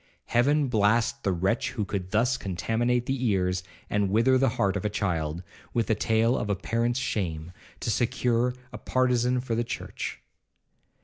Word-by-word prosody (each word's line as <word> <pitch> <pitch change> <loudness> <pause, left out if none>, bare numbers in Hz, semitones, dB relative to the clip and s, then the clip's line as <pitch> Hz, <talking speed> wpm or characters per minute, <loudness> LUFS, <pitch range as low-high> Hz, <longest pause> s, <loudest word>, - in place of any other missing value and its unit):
Heaven 140 +4 +2
blast 110 -1 +2
the 95 - 0
wretch 95 +6 0
who 110 -5 -2
could 95 -2 -4
thus 120 +5 +2
contaminate 120 +6 0
the 135 -1 -2
ears, 90 -3 +1 0.3
and 105 -1 +1
wither 115 +6 +4
the 135 -1 +3
heart 100 -1 +2
of 100 - -2
a 105 - 0
child, 85 -5 -2 0.3
with 115 -2 +2
the 110 - +2
tale 110 +3 +2
of 105 - -2
a 100 - +2
parent's 115 +5 -1
shame, 85 -9 -2 0.3
to - - 0
secure 120 +2 +1 0.2
a - - -6
partizan 125 -1 +1
for 125 -2 -3
the 115 +1 +1
church! 115 - -5
115 Hz, 170 wpm, -27 LUFS, 100-125 Hz, 0.3 s, wither